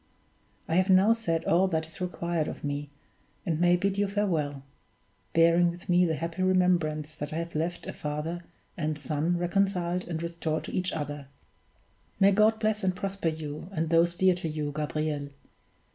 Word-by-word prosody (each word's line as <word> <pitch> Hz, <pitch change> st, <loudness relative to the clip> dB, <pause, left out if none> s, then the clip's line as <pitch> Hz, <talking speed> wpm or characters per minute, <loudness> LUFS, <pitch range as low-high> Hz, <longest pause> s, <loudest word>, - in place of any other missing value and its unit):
I 165 Hz, -, +1 dB
have 185 Hz, +1 st, +3 dB
now 190 Hz, +4 st, +6 dB
said 165 Hz, -8 st, -1 dB
all 180 Hz, +4 st, +4 dB
that 160 Hz, -3 st, -1 dB
is 160 Hz, +3 st, -11 dB
required 170 Hz, -3 st, -1 dB
of -, -, -7 dB
me, 145 Hz, 0 st, -3 dB, 0.6 s
and 165 Hz, -4 st, 0 dB
may 175 Hz, 0 st, +5 dB
bid 195 Hz, +2 st, 0 dB
you 205 Hz, -, +2 dB
farewell 165 Hz, -9 st, -1 dB, 0.7 s
bearing 170 Hz, +1 st, +5 dB
with 175 Hz, +2 st, -9 dB
me 180 Hz, 0 st, +5 dB
the 160 Hz, -2 st, 0 dB
happy 165 Hz, +3 st, -4 dB
remembrance 175 Hz, -5 st, +2 dB
that 150 Hz, -1 st, -6 dB
I -, -, -4 dB
have 170 Hz, +1 st, -4 dB
left 165 Hz, +3 st, -2 dB
a -, -, -5 dB
father 150 Hz, +4 st, -4 dB, 0.3 s
and 155 Hz, -2 st, -2 dB
son 150 Hz, +4 st, -1 dB
reconciled 180 Hz, 0 st, 0 dB
and 165 Hz, -1 st, -3 dB
restored 170 Hz, -2 st, -2 dB
to -, -, -7 dB
each 185 Hz, 0 st, 0 dB
other. 145 Hz, -2 st, -5 dB, 0.9 s
May 195 Hz, 0 st, +6 dB
God 215 Hz, +2 st, +4 dB
bless 215 Hz, -1 st, 0 dB
and 185 Hz, -1 st, +1 dB
prosper 195 Hz, -2 st, -2 dB
you, 155 Hz, +1 st, -6 dB
and 160 Hz, -3 st, -2 dB
those 170 Hz, +1 st, +4 dB
dear 185 Hz, +1 st, +4 dB
to 175 Hz, -2 st, -3 dB
you, 150 Hz, -1 st, -3 dB
Gabriel! 150 Hz, -1 st, -2 dB
170 Hz, 175 wpm, -28 LUFS, 155-185 Hz, 0.9 s, now